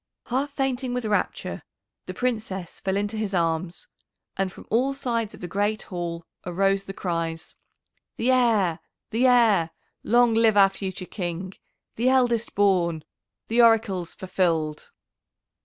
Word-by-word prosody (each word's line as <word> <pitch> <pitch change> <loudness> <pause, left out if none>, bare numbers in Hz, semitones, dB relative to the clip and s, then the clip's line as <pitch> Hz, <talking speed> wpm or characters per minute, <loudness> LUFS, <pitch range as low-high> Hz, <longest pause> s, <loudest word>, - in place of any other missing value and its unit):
Half 275 +4 -1
fainting 260 -2 -1
with 250 -2 -2
rapture 210 -1 -1 0.5
the - - -4
Princess 215 -8 -3
fell 190 0 -1
into 205 +2 -2
his 210 -3 -2
arms, 165 0 -1 0.5
and 195 -1 -1
from - - -13
all 260 +5 +2
sides 230 -5 -2
of - - -16
the 180 - -4
great 205 +4 -1
hall 170 -3 -5 0.2
arose 195 +2 +1
the - - -6
cries, 165 -3 -3 0.6
"The 245 +3 +2
Heir! 220 -10 +3 0.3
The 240 +4 +3
Heir! 225 -9 +4 0.3
Long 240 0 +4
live 225 -2 +4
our 195 -1 +7
future 190 -1 -6
King! 180 0 -5 0.4
The 240 +3 +3
eldest 245 -3 +2
born! 175 -6 +2 0.4
The 235 +2 +3
Oracle's 215 -7 +3
fulfilled!" 165 -5 -1
200 Hz, 140 wpm, -25 LUFS, 180-235 Hz, 0.6 s, our